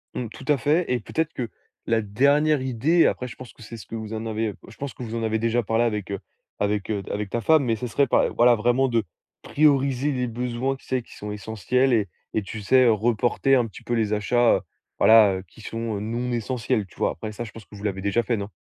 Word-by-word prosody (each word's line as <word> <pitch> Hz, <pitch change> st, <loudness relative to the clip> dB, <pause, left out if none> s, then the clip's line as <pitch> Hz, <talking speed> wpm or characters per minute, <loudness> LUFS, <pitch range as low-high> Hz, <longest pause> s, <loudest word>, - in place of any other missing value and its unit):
Mmh, 125 Hz, -, -3 dB
tout 135 Hz, -, -12 dB
à 145 Hz, -2 st, +4 dB
fait 150 Hz, +7 st, +2 dB
et 125 Hz, -, +1 dB
peut-être 160 Hz, +8 st, -2 dB
que 120 Hz, -3 st, -4 dB, 0.4 s
la 115 Hz, -1 st, +2 dB
dernière 140 Hz, +7 st, +2 dB
idée, 130 Hz, +7 st, +3 dB
après 125 Hz, -, -2 dB
je -, -, -10 dB
pense 130 Hz, -1 st, -11 dB
que -, -, -19 dB
c'est 115 Hz, +2 st, -9 dB
ce 110 Hz, -, -11 dB
que 115 Hz, -, -7 dB
vous 110 Hz, 0 st, -6 dB
en 110 Hz, +1 st, -4 dB
avez 110 Hz, -1 st, -2 dB
je -, -, -13 dB
pense 140 Hz, -2 st, -5 dB
que -, -, -12 dB
vous 115 Hz, -1 st, -5 dB
en 115 Hz, -, -2 dB
avez 110 Hz, 0 st, 0 dB
déjà 115 Hz, +1 st, +1 dB
parlé 115 Hz, +3 st, +1 dB
avec, 105 Hz, -4 st, -2 dB
heu, 100 Hz, -, -3 dB, 0.4 s
avec, 105 Hz, 0 st, -1 dB
heu, 100 Hz, -, -1 dB
avec 105 Hz, -1 st, -3 dB
ta 120 Hz, -, -1 dB
femme 155 Hz, +7 st, +4 dB
mais 115 Hz, -2 st, +1 dB
ce 120 Hz, +3 st, -4 dB
serait 140 Hz, +5 st, +2 dB
par -, -, +2 dB
voilà, 120 Hz, +1 st, +6 dB
vraiment 120 Hz, +4 st, +2 dB
de 115 Hz, -3 st, +1 dB, 0.4 s
prioriser 140 Hz, -2 st, +2 dB
les 125 Hz, -2 st, -1 dB
besoins, 125 Hz, +3 st, -2 dB
tu 135 Hz, -, -18 dB
sais, 130 Hz, -1 st, -1 dB
qui -, -, -16 dB
sont 105 Hz, 0 st, -6 dB
essentiels 110 Hz, +5 st, 0 dB
et 105 Hz, -4 st, +2 dB, 0.3 s
et 110 Hz, -, +2 dB
tu 105 Hz, +2 st, -7 dB
sais, 130 Hz, +5 st, +4 dB
heu, 115 Hz, -, +6 dB
reporter 120 Hz, +4 st, +1 dB
un 120 Hz, -3 st, +2 dB
petit 105 Hz, -, -13 dB
peu 120 Hz, -, -3 dB
les 110 Hz, -2 st, +1 dB
achats, 115 Hz, +3 st, +3 dB
heu, -, -, -1 dB, 0.4 s
voilà, 110 Hz, -3 st, +7 dB
heu, 95 Hz, -, -5 dB
qui 110 Hz, -, -17 dB
sont, 115 Hz, -1 st, -4 dB
heu, -, -, -4 dB
non 120 Hz, +4 st, -3 dB
essentiels, 115 Hz, -3 st, -1 dB
tu -, -, -21 dB
vois? -, -, 0 dB
Après 110 Hz, +6 st, -6 dB
ça, 120 Hz, +3 st, -6 dB
je 115 Hz, -, -9 dB
pense 110 Hz, -1 st, -12 dB
que -, -, -15 dB
vous 100 Hz, -, -10 dB
l'avez 95 Hz, -2 st, -2 dB
déjà 100 Hz, +4 st, +1 dB
fait 115 Hz, +1 st, 0 dB
non? 100 Hz, 0 st, -4 dB
115 Hz, 260 wpm, -24 LUFS, 105-125 Hz, 0.4 s, voilà